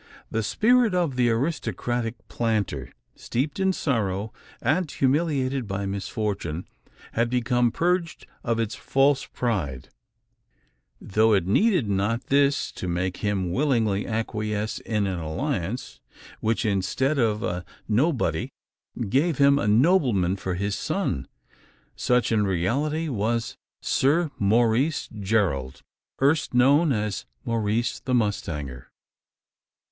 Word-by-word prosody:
The 115 - 0
spirit 230 - +3
of 170 -7 +1
the 125 -1 +3
aristocratic 120 - -2
planter 100 - -1 0.2
steeped 140 +8 -3
in 190 0 +3
sorrow, 110 - -1 0.3
and 165 +2 +1
humiliated 135 -3 0
by 100 +1 -3
misfortune 95 -3 -3 0.5
had 115 +1 +1
become 125 0 +2
purged 175 +2 -1 0.2
of 115 -2 0
its 115 0 -1
false 135 0 +2
pride; 90 - -2 1.1
though 110 +2 +2
it 95 -4 +2
needed 175 - +3
not 100 +4 -1
this 140 0 +2
to 90 - -6
make 90 +1 -1
him 95 -4 -1
willingly 115 -6 +1
acquiesce 110 -1 -2
in 105 -3 -1
an 95 -3 -2
alliance, 80 -1 -3 0.4
which, 115 +2 0
instead 110 +9 0
of 110 -3 +1
a 90 -1 -2 0.2
"nobody," 130 +6 +1 0.6
gave 140 - +1
him 140 0 +5
a - - -1
nobleman 115 - +3
for 95 -2 -3
his 100 +2 -1
son. - - -2 0.7
Such, 125 -1 +1
in 110 -2 +3
reality, 140 - 0
was 115 -2 -1 0.3
Sir 150 +4 +2
Maurice 115 +8 +2
Gerald 95 -11 0 0.4
erst 140 -1 +2
known 140 +6 +5
as 105 -4 -2 0.2
Maurice 115 0 0
the 130 - -1
mustanger! 75 - -2
115 Hz, 115 wpm, -25 LUFS, 100-140 Hz, 1.1 s, him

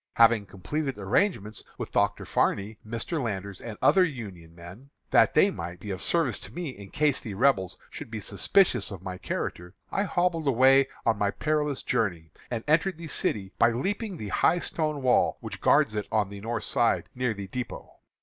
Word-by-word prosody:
Having 115 -3 +5
completed 135 - -3
arrangements 105 - 0
with - - -5
Dr. - - +1
Farney, 105 +2 0
Mr. 115 - -3
Landers, 100 -4 -4
and 110 -3 -7
other 190 - +6
Union 100 - -6
men, 90 +11 -12 0.2
that - - +5
they - - +5
might 85 +1 -6
be 105 - -6
of 95 - -3
service 165 -8 +2
to - - -11
me 175 -3 -4
in 100 -6 -10
case 150 +2 +1
the 105 -5 -7
Rebels 95 -6 +2
should 145 - -8
be 110 -1 -5
suspicious 120 - +2
of 95 -3 -8
my 90 -1 -6
character, 90 +2 -4 0.2
I - - 0
hobbled 175 -4 0
away 135 +1 +5 0.2
on 115 -3 +2
my 100 - +2
perilous 150 +3 -1
journey, 85 -7 -1 0.2
and 115 -2 -3
entered 165 +4 +2
the 170 - -8
city 95 -7 -1
by 115 - +6
leaping 200 - -2
the 105 - -6
high 170 - +3
stone 155 -4 -2
wall 125 -1 +3
which - - -7
guards 110 - +4
it 105 -1 -3
on 105 -3 +1
the 100 0 -9
north 115 +2 -3
side 120 -3 +1
near 125 -3 -1
the 100 -1 -6
dépôt. 125 +4 -5
115 Hz, 190 wpm, -27 LUFS, 100-150 Hz, 0.2 s, other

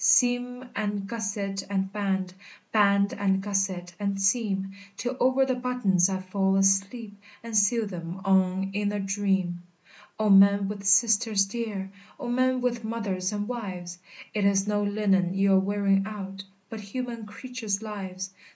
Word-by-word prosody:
Seam, 245 0 +3
and 205 -2 -2
gusset, 200 -3 -3
and 195 -1 -1
band, 190 -3 -1 0.4
Band, 200 -1 +3
and 195 -1 +1
gusset, 195 -3 -2
and 200 -1 -1
seam, 195 -2 +1 0.3
Till 250 +1 -3
over 260 +1 +3
the 260 - 0
buttons 245 -8 +1
I 190 -1 -2
fall 190 +1 0
asleep, 195 +3 +1 0.3
And 230 -1 -6
sew 215 +2 +3
them 175 -2 -6
on 190 0 +2
in 205 0 0
a 205 - -2
dream! 195 -3 -1 0.6
"O 215 - 0
men 200 0 +6
with 200 0 -6
sisters 215 -1 +4
dear! 200 -3 -4 0.3
O 255 - -5
men 255 +1 +1
with 240 -2 -1
mothers 205 -4 -2
and 205 0 -3
wives! 185 -7 -6 0.3
It 210 - 0
is 200 0 +2
no 205 0 +1
linen 195 -3 +1
you're 195 0 +4
wearing 195 0 +1
out, 195 -2 -7 0.2
But 220 +2 -7
human 230 +1 -5
creatures' 220 -3 -4
lives! 190 -3 -6
200 Hz, 150 wpm, -27 LUFS, 195-220 Hz, 0.6 s, men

